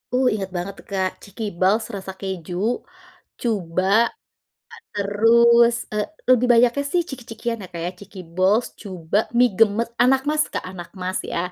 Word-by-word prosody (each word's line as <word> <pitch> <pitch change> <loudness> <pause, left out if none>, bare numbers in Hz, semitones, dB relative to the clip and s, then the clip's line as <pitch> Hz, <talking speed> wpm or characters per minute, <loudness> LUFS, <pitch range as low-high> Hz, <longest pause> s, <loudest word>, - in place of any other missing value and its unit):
Uh, 255 0 +3
inget 195 -2 -4
banget 180 +3 -3
tuh, - - -15
Kak, 190 -1 +1
chikiballs 200 +1 0
rasa 190 -1 -6
keju, 185 -3 -5 0.9
cuba, 185 -6 -1 1.1
terus, 235 +3 +4 0.2
eee, 210 -1 0 0.2
lebih 250 -1 +5
banyaknya 245 +4 +4
sih 355 - +3
ciki-cikian 235 -2 -5
ya, - - -7
Kak, 170 - -5
ya, 180 - -2
cikiballs, 190 +2 0 0.2
cuba, 185 -1 -2 0.2
mie 245 0 +6
gemes, 225 +1 +3
anakmas, 270 +4 +2
Kak, - - -2
anakmas 185 +1 -6 0.2
ya, - - -1
205 Hz, 135 wpm, -22 LUFS, 185-235 Hz, 1.1 s, mie